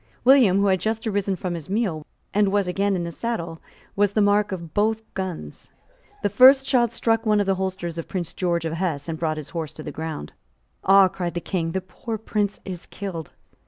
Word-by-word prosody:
William, 250 -7 +6
who 200 - +3
had 190 -2 +3
just 220 +3 -2
risen 200 -2 0
from 180 0 -4
his 165 -1 -6
meal, 195 -7 -1 0.3
and 205 -1 +3
was 200 -2 +1
again 195 +2 +1
in 175 - -2
the 170 - -4
saddle, 170 -6 -4 0.3
was 205 0 +2
the 215 - +1
mark 205 0 +3
of 170 -4 -6
both 220 +1 +1
guns. 180 - -6 0.5
The - - +4
first 265 +5 +7
shot 240 -4 +2
struck 225 -1 +1
one 215 -2 +3
of 205 - +2
the 195 - +2
holsters 185 -3 -3
of 165 - -6
Prince 175 -3 -4
George 170 -2 -1
of 160 - -2
Hesse, 165 -4 -2
and 160 -1 -4
brought 155 -2 -1
his 155 - -7
horse 160 -3 -4
to 155 - -9
the 150 - -6
ground. 160 - -6 0.5
"Ah!" 195 0 +7
cried 175 -2 -4
the - - 0
King; 165 -2 -2
"the 190 - -1
poor 220 +5 -6
Prince 210 -1 -2
is 180 -3 -7
killed." 175 -6 -6
190 Hz, 215 wpm, -24 LUFS, 170-205 Hz, 0.5 s, first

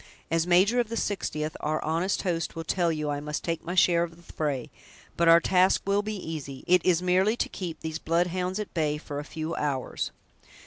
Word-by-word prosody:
As 165 +1 +1
major 190 +7 +4
of 235 -3 0
the 230 - -3
Sixtieth, 155 -8 -2
our 155 +1 -1
honest 165 +5 0
host 170 -4 -1
will 165 - -4
tell 170 +1 +1
you 150 -2 -2
I 145 - -2
must 150 +1 -4
take 165 -1 -2
my 175 - -4
share 175 -2 +5
of 170 -1 -3
the 170 - -16
fray; 145 -5 -2 0.4
but 170 - +2
our 165 0 +9
task 185 +2 +3
will 200 +1 +2
be 215 +1 -4
easy; 155 -7 -6
it 180 -1 +4
is 180 -1 +3
merely 190 +5 +3
to - - 0
keep 175 -4 -6
these 160 0 -4
blood 170 +2 +2
hounds 180 +1 -2
at 210 - -5
bay 150 -3 0
for 145 -1 -6
a - - -4
few 160 +2 -5
hours." 140 -5 -2
170 Hz, 220 wpm, -27 LUFS, 155-185 Hz, 0.4 s, our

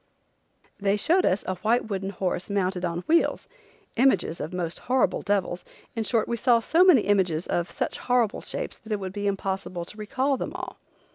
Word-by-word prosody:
They 200 0 +1
showed 350 - +3
us 190 - +1
a 185 - -3
white 220 +5 +1
wooden 195 -2 -3
horse 185 -1 -3
mounted 190 -2 -1
on 170 0 -2
wheels, 335 - +1 0.5
images 200 -10 +2
of 155 - -4
most 175 -2 -3
horrible 260 0 +2
devils, 190 -3 -1 0.3
in 225 - -1
short, 225 0 +1
we 235 - -1
saw 240 0 +4
so 325 +10 +3
many 355 - +7
images 185 -5 +1
of 175 0 -1
such - - -3
horrible 245 -3 +1
shapes - - -5
that 220 - -12
it 210 - 0
would 190 -1 -5
be 205 0 -2
impossible 195 -3 -3
to 210 - -12
recall 260 +6 0
them - - -4
all. - - -7
200 Hz, 190 wpm, -26 LUFS, 185-235 Hz, 0.5 s, many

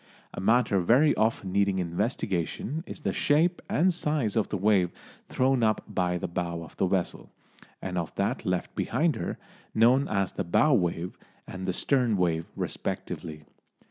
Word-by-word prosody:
A - - -5
matter 110 -1 +3
very 125 - +4
often 110 -3 0
needing 100 0 +2
investigation 95 - -2
is - - -8
the - - -1
shape 165 +4 +2
and 180 +3 +3
size 150 - -1
of 110 - +1
the 100 - -1
wave 95 -2 +3 0.4
thrown 130 -1 +2
up 110 -2 +2
by 90 -1 0
the - - -3
bow 85 -1 -3
of 80 - -13
the 95 - +2
vessel, 90 -1 -2 0.5
and 90 -1 -2
of 85 - -5
that - - -1
left - - -2
behind 160 -1 +1
her, 85 - -4 0.4
known 125 +5 +4
as 100 -3 0
the 100 - -3
"bow 140 - +3
wave" 90 -4 -1 0.3
and 95 0 -6
the - - +2
"stern 125 -1 +1
wave" 85 -3 0
respectively. 75 -1 -4
100 Hz, 165 wpm, -27 LUFS, 90-130 Hz, 0.5 s, very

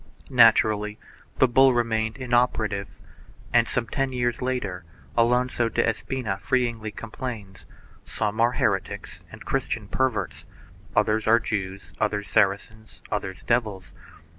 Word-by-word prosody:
Naturally 110 -3 +4 0.4
the 130 - +5
bull 130 +1 +5
remained 110 -2 0
inoperative, 120 -5 0 0.7
and, - - +4
some 125 - -1
ten 135 +3 -2
years 120 -1 -1
later, 115 -8 -2 0.3
Alonso 120 0 +2
de - - +1
Espina 110 -2 -2
feelingly 115 0 0
complains 110 -2 -7 0.4
"Some 110 +1 -2
are 120 +1 +3
heretics - - -2
and - - -12
Christian 120 -5 -2
perverts, 130 +3 -2 0.5
others 110 0 +2
are 115 +1 +6
Jews, 100 -3 -4
others 105 -1 -1
Saracens, 105 +2 0
others 95 -1 -4
devils. 105 - -1
110 Hz, 115 wpm, -25 LUFS, 105-125 Hz, 0.7 s, are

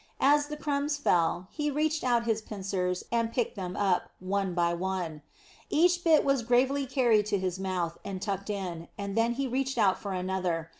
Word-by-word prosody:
As 290 +1 +4
the 300 0 -6
crumbs 290 0 -1
fell, 175 - +1
he 295 -1 -1
reached 305 +2 0
out 240 -2 +2
his 225 -1 0
pincers 190 -3 -3
and 230 -1 +1
picked 240 0 -1
them 185 -3 -5
up, 195 -3 +1
one 190 -1 -1
by 170 -1 +2
one. 175 -3 -3 0.5
Each 350 +2 +3
bit 320 -3 +5
was 275 -2 +2
gravely 260 +4 +2
carried 235 -6 +3
to 205 - +1
his 185 -1 -2
mouth, 180 -3 -2
and 195 -2 -5
tucked 200 0 -3
in, 180 -5 -4
and 200 0 -4
then 230 +1 +2
he 270 +2 -2
reached 265 +1 -1
out 200 -4 +3
for 200 -3 -4
another. 180 -3 -2
205 Hz, 190 wpm, -29 LUFS, 185-270 Hz, 0.5 s, bit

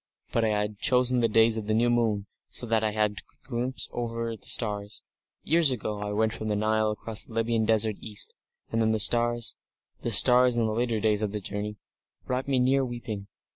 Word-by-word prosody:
But 115 - 0
I - - +2
had 105 -1 -2
chosen 125 -2 +3
the 115 -1 +2
days 115 +1 +4
of 105 -2 -5
the 110 - +1
new 120 +2 +2
moon, 110 -4 0 0.2
so - - -3
that 110 -1 0
I 110 - +1
could 105 - -7
have 105 -1 +2
a 105 - -15
glimpse 125 0 0
of 120 -1 -3
the 115 0 -4
stars.... 105 -2 -2 0.4
Years 165 -1 +4
ago, 105 -4 -2
I 105 0 -4
went 110 +1 0
from 110 -1 -6
the 105 - 0
Nile 110 +1 +1
across 105 0 +1
the 115 - -13
Libyan 115 0 0
Desert 110 -1 +2
east, 105 -2 -2 0.4
and 115 - 0
then 110 0 +2
the 110 - 0
stars 120 +1 +3 0.5
the - - -3
stars 125 0 +6
in 115 - +2
the 110 - -1
later 115 -1 -1
days 105 -1 +1
of 105 -1 -2
that 105 -2 -5
journey 105 +2 -5 0.5
brought 130 +1 -3
me 135 -2 +1
near 130 +2 +2
weeping.... 120 -5 -6
110 Hz, 215 wpm, -26 LUFS, 105-120 Hz, 0.5 s, stars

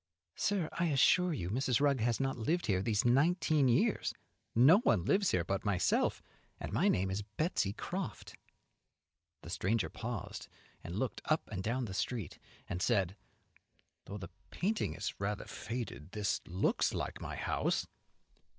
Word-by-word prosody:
"Sir, 195 -5 0
I 170 - 0
assure 165 +4 +4
you 90 - -3
Mrs. 125 0 +1
Rugg 140 -2 +3
has 115 0 +1
not 135 0 0
lived 160 +10 0
here 95 -3 +1
these 105 +1 +1
nineteen 150 +2 +3
years; 120 - +2 0.4
no 140 - +7
one 110 - +2
lives 195 - +3
here 90 - +2
but 95 +3 -2
myself, 100 -4 +1 0.4
and - - -5
my - - +3
name 95 +1 +2
is 95 +2 -1
Betsey 105 - -1
Croft." 175 - -5 1.1
The 85 - -8
stranger 100 +4 0
paused, - - -5 0.4
and 85 +3 -5
looked 130 +3 -2
up 155 +1 +1
and 95 -3 -3
down 120 +5 -1
the 95 - -6
street 105 - -3 0.3
and 90 - -3
said, 95 -1 +2 0.9
"Though 100 - -6
the 95 -3 -8 0.2
painting 190 - -1
is 100 +3 -3
rather 100 +1 -2
faded, 110 - -6
this 105 -2 0
looks 90 +3 +1
like - - -4
my - - -5
house." - - 0
115 Hz, 155 wpm, -33 LUFS, 95-145 Hz, 1.1 s, no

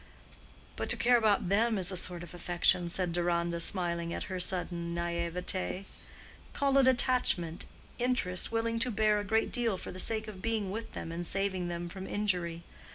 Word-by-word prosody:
"But - - -3
to - - +3
care 245 +1 +4
about 210 -5 +2
them 220 +3 +3
is 185 -1 +2
a - - -3
sort 175 -1 0
of 175 - -10
affection," 175 0 +2
said 175 0 -1
Deronda, 170 0 0
smiling 170 -1 -1
at - - -3
her 185 - -2
sudden 175 -2 -1
naïveté. 170 +2 -2 0.7
"Call 275 -1 +3
it 265 - +5
attachment; 245 -10 +2 0.3
interest, 240 -8 0
willing 230 0 0
to 250 - +3
bear 215 -1 +2
a - - -3
great 220 +2 +1
deal 230 -5 0
for - - -7
the 185 - -7
sake 220 +3 +2
of 200 -3 -8
being 220 -3 -1
with 225 +3 -5
them 165 - -5
and 170 +1 -4
saving 190 -2 0
them 175 0 -4
from 190 +2 -7
injury. 175 -5 -1
185 Hz, 180 wpm, -31 LUFS, 175-220 Hz, 0.7 s, it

